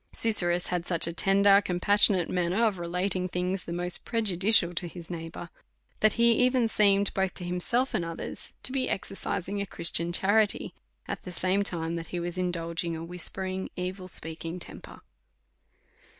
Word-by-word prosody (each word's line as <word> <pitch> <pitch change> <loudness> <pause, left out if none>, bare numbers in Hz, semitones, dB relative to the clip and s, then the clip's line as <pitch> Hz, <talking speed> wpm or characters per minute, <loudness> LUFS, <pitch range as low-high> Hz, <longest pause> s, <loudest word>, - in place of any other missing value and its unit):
Susurrus 175 -6 +4
had 175 -1 -2
such 170 -2 +1
a 170 - -4
tender, 200 +2 +4
compassionate 190 -1 +3
manner 180 +5 0
of 205 -5 -1
relating 180 +2 -1
things 180 +1 -2
the - - -7
most 175 +1 +1
prejudicial 200 -4 +3
to 175 +1 0
his 170 0 -10
neigh 165 -1 -6
bour, 170 +1 -10 0.5
that 215 - +4
he 235 0 +4
even 250 -2 +2
seemed, 200 -2 +2
both 190 -1 -1
to 180 - -8
himself 180 +9 -1
and 175 - 0
others, 165 0 -6
to - - -1
be 260 -1 -1
exercising 195 0 -3
a - - -2
Christian 170 0 +1
charity 205 +4 +2 0.3
at - - -5
the 180 - -9
same 185 +3 0
time 170 -4 -1
that 165 - -7
he 175 - -4
was 175 0 -4
indulging 170 -1 -2
a 160 - -7
whispering, 185 +2 -3
evil 185 +1 -5
speaking 165 0 -6
temper. 180 - -11
180 Hz, 165 wpm, -27 LUFS, 175-200 Hz, 0.5 s, Susurrus